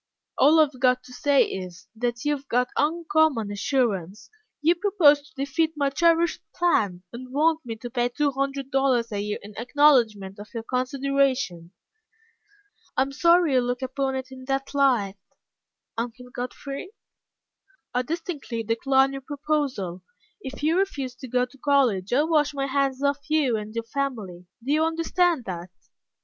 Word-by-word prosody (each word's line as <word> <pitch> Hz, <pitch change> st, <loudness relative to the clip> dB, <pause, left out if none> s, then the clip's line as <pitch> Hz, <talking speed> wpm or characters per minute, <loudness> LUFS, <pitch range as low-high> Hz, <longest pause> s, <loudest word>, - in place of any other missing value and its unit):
"All 305 Hz, +4 st, +5 dB
I -, -, +9 dB
have 275 Hz, -4 st, -5 dB
got 250 Hz, 0 st, +3 dB
to 250 Hz, 0 st, -14 dB
say 285 Hz, +2 st, +3 dB
is, 180 Hz, -2 st, -7 dB
that 240 Hz, +3 st, -3 dB
you 295 Hz, 0 st, +2 dB
have 275 Hz, -1 st, -11 dB
got 250 Hz, 0 st, +1 dB
uncommon 310 Hz, -7 st, +1 dB
assurance. 205 Hz, -, -1 dB, 0.3 s
You 320 Hz, +3 st, +4 dB
propose 345 Hz, -6 st, +4 dB
to 290 Hz, -, -22 dB
defeat 280 Hz, +4 st, 0 dB
my 280 Hz, -2 st, 0 dB
cherished 335 Hz, +3 st, +2 dB
plan, 205 Hz, -, +1 dB
and 255 Hz, +2 st, -9 dB
want 315 Hz, +3 st, +2 dB
me 230 Hz, -3 st, -5 dB
to 240 Hz, +2 st, -8 dB
pay 245 Hz, 0 st, 0 dB
two 285 Hz, +4 st, 0 dB
hundred 275 Hz, 0 st, -3 dB
dollars 260 Hz, -4 st, +2 dB
a 205 Hz, -, -2 dB
year 210 Hz, 0 st, -3 dB
in 205 Hz, 0 st, -11 dB
acknowledgment 235 Hz, -7 st, +3 dB
of 205 Hz, +1 st, -10 dB
your 230 Hz, -, -3 dB
consideration." 255 Hz, -8 st, 0 dB, 1.3 s
"I 260 Hz, -, +5 dB
am 270 Hz, -, -6 dB
sorry 335 Hz, +1 st, +4 dB
you 255 Hz, -, +4 dB
look 245 Hz, +1 st, -2 dB
upon 265 Hz, +1 st, -2 dB
it 260 Hz, 0 st, -5 dB
in 260 Hz, 0 st, -10 dB
that 270 Hz, +1 st, -2 dB
light, 245 Hz, -9 st, +2 dB, 0.8 s
Uncle 245 Hz, +2 st, -5 dB
Godfrey." 275 Hz, -, -6 dB, 1.0 s
"I 250 Hz, -, +2 dB
distinctly 295 Hz, -5 st, -4 dB
decline 265 Hz, +5 st, +2 dB
your 270 Hz, -, -5 dB
proposal. 275 Hz, -, -2 dB, 0.4 s
If 270 Hz, -4 st, -8 dB
you 325 Hz, +4 st, +3 dB
refuse 280 Hz, -10 st, -2 dB
to 260 Hz, -, -8 dB
go 250 Hz, +1 st, +1 dB
to 250 Hz, +2 st, -19 dB
college, 250 Hz, -10 st, +2 dB
I 270 Hz, +4 st, +4 dB
wash 305 Hz, -2 st, +1 dB
my 275 Hz, -1 st, -1 dB
hands 275 Hz, 0 st, 0 dB
of 280 Hz, 0 st, +2 dB
you 300 Hz, -6 st, +2 dB
and 215 Hz, +1 st, -6 dB
your 230 Hz, -, -2 dB
family. 225 Hz, -9 st, -4 dB, 0.2 s
Do 275 Hz, -, -1 dB
you 310 Hz, +1 st, +3 dB
understand 330 Hz, -2 st, +1 dB
that?" 180 Hz, -1 st, -6 dB
270 Hz, 165 wpm, -25 LUFS, 235-295 Hz, 1.3 s, I